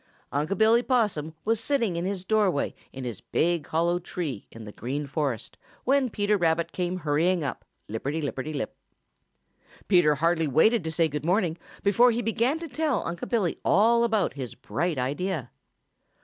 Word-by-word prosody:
Unc' 150 +8 -1
Billy 225 +2 +5
Possum 210 - 0
was 225 0 +2
sitting 230 -6 0
in 170 +1 -2
his 190 -1 -3
doorway 200 -8 +1 0.2
in 135 - -7
his 120 -5 -5
big, 170 -1 0
hollow 170 +2 +1
tree 165 - -5
in 115 - -10
the 105 - -8
Green 135 +8 -4
Forest 140 -5 -3 0.3
when 270 0 +2
Peter 205 -1 +1
Rabbit 165 -2 +1
came 180 0 -2
hurrying 165 +2 +1
up, 140 - -4 0.2
lipperty 135 +9 -3
lipperty 145 0 -3
lip. 140 -7 -4 1.1
Peter 175 -6 +5
hardly 165 +1 +1
waited 175 - +4
to 160 - -1
say 165 +1 +2
good 150 -1 -4
morning 175 -1 +1 0.3
before 210 +5 +5
he 240 0 0
began 235 +6 +1
to 335 0 -6
tell 300 0 -1
Unc' 170 0 -4
Billy 210 -8 0
all 230 +5 +4
about 220 -4 +1
his 130 -5 -6
bright 160 +9 -2
idea. 140 +2 -2
175 Hz, 165 wpm, -27 LUFS, 150-215 Hz, 1.1 s, Billy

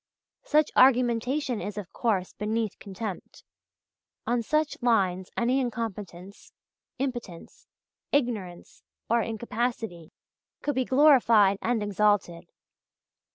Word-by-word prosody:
Such 305 0 +2
argumentation 250 0 +3
is, 205 0 -6
of 200 -4 -7
course, 200 -6 -1
beneath 215 0 -3
contempt. 200 -1 -7 0.8
On 240 0 0
such 305 +6 0
lines 190 -6 +1
any 245 +3 +2
incompetence, 205 -6 -6 0.5
impotence, 240 -10 -6 0.4
ignorance, 215 -11 -2 0.3
or 235 0 +4
incapacity, 225 -6 -4 0.5
could 290 - 0
be 260 -1 0
glorified 235 -8 +5
and 230 -2 0
exalted. 205 -4 0
225 Hz, 95 wpm, -27 LUFS, 195-245 Hz, 0.8 s, glorified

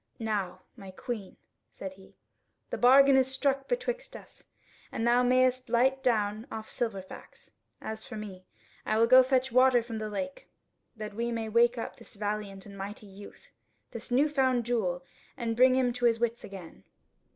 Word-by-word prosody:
"Now, 200 -5 -3
my 195 -5 -11
Queen," 205 +1 -6 0.3
said 190 -1 -8
he, 190 0 -18 0.6
"the - - -2
bargain 270 +2 +7
is 260 -1 +4
struck 270 +1 -1
betwixt - - -3
us, - - -13 0.5
and 225 - -2
thou 240 +1 +4
mayest 255 0 +2
light 260 +3 +2
down 215 -1 0
off 220 -1 -7
Silverfax; 200 -6 -6 0.3
as 220 0 -6
for 250 -4 -9
me, 200 -4 -8 0.4
I 215 - 0
will 225 - +5
go 255 +2 +8
fetch 260 -1 +1
water 255 -1 +5
from 225 -1 -6
the 215 0 -4
lake, 275 +6 -5 0.5
that 215 -2 -7
we 235 +3 -2
may 225 -1 -3
wake 235 +2 +3
up 230 - -5
this - - -16
valiant 205 -1 -4
and 200 -1 -11
mighty 200 +2 -7
youth, 200 0 -14 0.4
this 230 +1 -8
newfound 260 -2 +2
jewel, 185 -7 -1 0.3
and 230 -3 -2
bring 255 +2 +5
him 250 -2 +2
to 245 0 -2
his 230 -1 +3
wits 235 0 -1
again." 190 -4 -10
235 Hz, 170 wpm, -29 LUFS, 210-255 Hz, 0.6 s, go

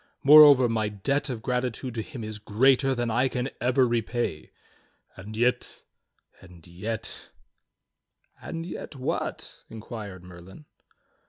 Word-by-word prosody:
Moreover, 145 -3 +8
my 110 -2 -1
debt 135 +9 -2
of 115 -4 -5
gratitude 125 0 -3
to 115 - -3
him 125 -1 -9
is 110 0 -7
greater 130 +5 +2
than 120 -1 -2
I 125 +4 +2
can 125 +1 -3
ever 125 +1 +2
repay. 120 -7 -2 0.7
And 105 +4 -9
yet 120 +2 -1 0.3
— - - -33
and 90 -3 -16
yet 100 +6 -6 0.3
— - - -59
" - - -38
"And 165 0 -6
yet 170 - -8
what?" 130 -1 -5
inquired 105 -4 -9
Merlin. 90 - -14
120 Hz, 140 wpm, -26 LUFS, 105-130 Hz, 0.7 s, Moreover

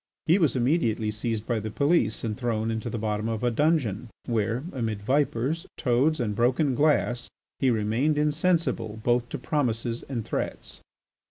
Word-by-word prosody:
He 170 +5 +4
was 160 -6 +2
immediately 120 -5 +1
seized 110 0 -3
by 115 -2 0
the 110 +1 -4
police 140 - +1
and 110 -2 -2
thrown 115 -2 -1
into 110 +1 -3
the 115 - -3
bottom 105 0 -1
of 115 +1 -3
a 120 - +2
dungeon 125 - +1 0.2
where, 115 +2 0
amid 110 -6 -3
vipers, 140 - 0
toads, 140 +4 +2
and 105 -4 -1
broken 130 +5 +2
glass, 135 -3 +1 0.3
he 135 - +3
remained 115 +7 +1
insensible 150 -8 +1
both 120 0 +1
to - - -4
promises 120 -4 -1
and 120 -5 -3
threats. - - -4
120 Hz, 160 wpm, -26 LUFS, 110-145 Hz, 0.3 s, He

